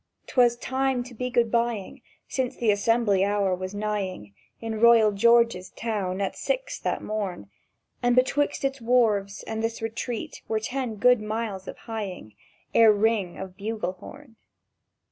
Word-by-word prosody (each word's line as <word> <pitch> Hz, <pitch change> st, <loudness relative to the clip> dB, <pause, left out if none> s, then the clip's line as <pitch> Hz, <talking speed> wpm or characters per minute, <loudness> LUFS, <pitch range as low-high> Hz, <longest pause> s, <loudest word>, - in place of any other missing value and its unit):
'Twas 240 Hz, -2 st, +3 dB
time 265 Hz, 0 st, -1 dB
to 250 Hz, 0 st, -12 dB
be 250 Hz, +2 st, -3 dB
Good 235 Hz, -2 st, +2 dB
bying, 235 Hz, -4 st, -1 dB, 0.3 s
Since 260 Hz, -1 st, -2 dB
the 230 Hz, -3 st, +3 dB
assembly 205 Hz, -1 st, +2 dB
hour 200 Hz, -1 st, +1 dB
was 185 Hz, +2 st, -5 dB
nighing 195 Hz, -, -3 dB, 0.3 s
In 225 Hz, -1 st, -4 dB
royal 230 Hz, -2 st, +6 dB
George's 230 Hz, -2 st, +3 dB
town 200 Hz, -5 st, -2 dB
at 195 Hz, -, -2 dB
six -, -, -2 dB
that -, -, -2 dB
morn; 195 Hz, -, -4 dB, 0.5 s
And 245 Hz, -1 st, +3 dB
betwixt 275 Hz, +3 st, +1 dB
its 270 Hz, -1 st, -2 dB
wharves 220 Hz, -5 st, +2 dB
and 220 Hz, 0 st, -4 dB
this 225 Hz, 0 st, -2 dB
retreat 225 Hz, +1 st, -5 dB
were 220 Hz, -, 0 dB
ten 245 Hz, 0 st, -3 dB
good 245 Hz, +2 st, +4 dB
miles 215 Hz, -3 st, -4 dB
of -, -, -7 dB
hieing 200 Hz, -, -6 dB, 0.4 s
Ere 225 Hz, -1 st, +7 dB
ring 205 Hz, -4 st, +1 dB
of 190 Hz, -1 st, -7 dB
bugle 210 Hz, -1 st, -3 dB
horn. 230 Hz, +6 st, -13 dB
225 Hz, 150 wpm, -26 LUFS, 200-240 Hz, 0.5 s, Ere